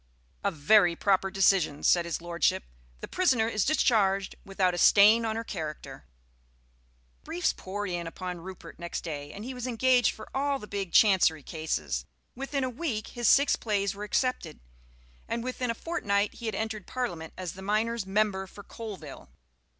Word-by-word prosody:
"A - - +2
very 175 +3 +4
proper 195 0 +2
decision," 190 -6 +2
said 175 -1 +4
his 170 0 -4
lordship. 170 0 +1 0.4
"The - - -5
prisoner 260 -12 +2
is 215 -3 0
discharged 200 -9 +2
without 190 -2 0
a 175 - -3
stain 215 +5 +6
on 220 -1 -1
her 225 - -3
character." 150 -8 -7 1.2
Briefs 335 +3 -1
poured 200 0 -5
in 175 -1 -3
upon 180 0 -6
Rupert 180 -2 -10
next 170 0 -4
day, 145 -3 -6
and 205 +6 -8
he 260 - -5
was 250 0 -5
engaged 250 0 +3
for 215 - -11
all 280 +1 0
the 210 - -9
big 200 -3 -4
Chancery 180 -8 +4
cases. 80 - -3 0.3
Within 275 +1 -3
a - - 0
week 235 -5 -3
his 240 -2 -2
six 280 +6 +5
plays 200 -3 -1
were 205 +1 -7
accepted, 210 - -1 0.7
and 230 - -3
within 250 0 -3
a 230 - -1
fortnight 205 -10 -1
he 235 - -7
had 220 - -2
entered 215 -3 -4
Parliament 175 -11 -4
as 180 -3 -5
the 190 - -11
miners' 215 +1 -1
Member 195 -1 0
for 205 +2 -12
Coalville. 195 - -9
200 Hz, 170 wpm, -28 LUFS, 175-230 Hz, 1.2 s, stain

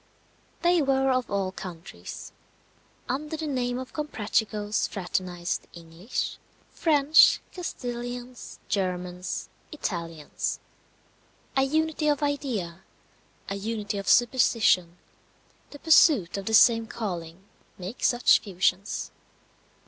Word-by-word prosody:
They 345 -1 +4
were 270 -1 +2
of 255 -1 0
all 195 -2 -1
countries. 165 - -9 0.8
Under 300 +5 -3
the 315 - -4
name 250 -4 -1
of 255 0 -7
Comprachicos 215 -7 -1
fraternized 180 -2 -3
English, 170 +6 -5 0.3
French, 305 -1 +5
Castilians, 245 -6 -6
Germans, 180 -2 -3 0.2
Italians. 170 - -4 1.0
A 270 - +4
unity 310 +3 0
of 295 -1 +1
idea, 235 - -2 0.7
a - - -3
unity 205 0 -3
of 195 - -7
superstition, 225 -8 +3 0.7
the 290 - -10
pursuit 290 - +5
of 195 -1 -5
the 220 - +3
same 230 0 +6
calling, 180 -6 -5 0.3
make 190 +5 -7
such 240 -2 +5
fusions. 190 0 -1
225 Hz, 100 wpm, -26 LUFS, 185-270 Hz, 1.0 s, same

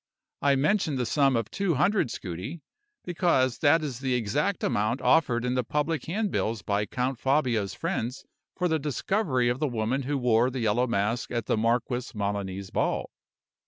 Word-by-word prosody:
I 140 0 +4
mention 155 +2 +1
the 125 -2 -1
sum 135 +1 +2
of 115 -2 -2
two 195 -5 0
hundred 180 +2 +2
scudi, 100 - -6 0.4
because 165 -8 +1
that 155 +2 +4
is 135 -6 -4
the 130 -2 0
exact 145 - -1
amount 110 +5 0
offered 125 -6 +3
in 125 - 0
the 125 0 +1
public 150 +3 -1
handbills 175 - -1
by 105 0 0
Count 125 +2 -2
Fabio's 125 -8 +1
friends 120 +4 -3 0.3
for 180 - +1
the 160 -2 +1
discovery 145 - 0
of 120 +2 0
the 150 - +1
woman 120 +2 -1
who 140 +2 -1
wore 120 -1 +3
the 130 -1 -4
yellow 115 +3 +2
mask 110 +1 -1
at 120 -1 -2
the - - +1
Marquis 120 +3 0
Melani's 100 -2 -3
ball. - - -1
125 Hz, 170 wpm, -27 LUFS, 115-150 Hz, 0.4 s, I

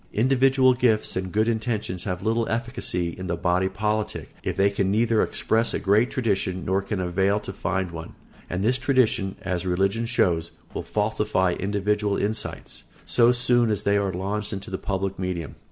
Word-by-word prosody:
Individual 130 +2 +4
gifts 120 -4 +1
and 95 0 -3
good 110 +3 +2
intentions 110 -5 -2
have 90 -2 -3
little 115 +1 0
efficacy 115 -7 -1
in 95 +2 -7
the 85 - -1
body 90 +2 +1
politic 105 +2 -2
if - - -3
they 100 +1 +2
neither 110 +3 +2
express 115 +1 0
a - - -1
great 105 +5 +3
tradition 95 -6 -1
nor 95 +1 +1
can 100 0 -3
avail 95 +3 +1
to 95 - -7
found 95 -1 -2
one; 80 -1 -8 0.3
and 90 +3 -2
this 125 +4 +2
tradition, 125 -7 +1
as 90 -2 -2
religion 95 +5 0
shows, 85 -8 +1 0.2
will - - -3
falsify 95 -1 0
individual 105 +1 0
insights 105 +2 -3 0.2
so 120 0 +5
soon 120 -1 +2
as 105 - -1
they 100 - +2
are 100 -1 +1
launched 100 +3 -3
into 100 +1 -5
the - - -3
public 95 -1 -3
medium. 90 -4 -3
100 Hz, 170 wpm, -25 LUFS, 95-115 Hz, 0.3 s, so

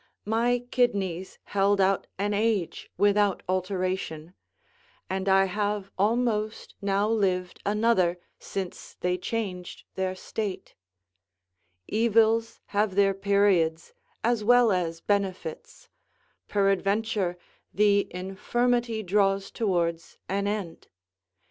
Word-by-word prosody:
My 240 +3 +1
kidneys 195 -8 0
held 200 0 +1
out 195 0 +2
an 205 +2 0
age 210 -4 -1
without 205 -1 +2
alteration; 185 -3 -2 0.8
and 190 +1 -1
I 195 0 +5
have 205 0 -2
almost 215 +1 0
now 200 +1 +1
lived 185 -5 0
another, 205 -5 +2 0.2
since 190 -2 -6
they 180 0 +1
changed 185 -4 -4
their 185 -1 -2
state; 200 +1 -5 1.1
evils 225 +1 +2
have 205 -1 +1
their 195 -1 +4
periods, 195 -5 +2 0.3
as 235 -2 +1
well 245 0 +5
as 165 -3 -1
benefits: 200 - -3 0.6
peradventure, 195 -1 +1 0.3
the 205 -1 +3
infirmity 230 +5 -1
draws 195 0 +1
towards 170 -6 -1
an 200 +1 -1
end. 205 -5 -4
200 Hz, 100 wpm, -27 LUFS, 185-215 Hz, 1.1 s, I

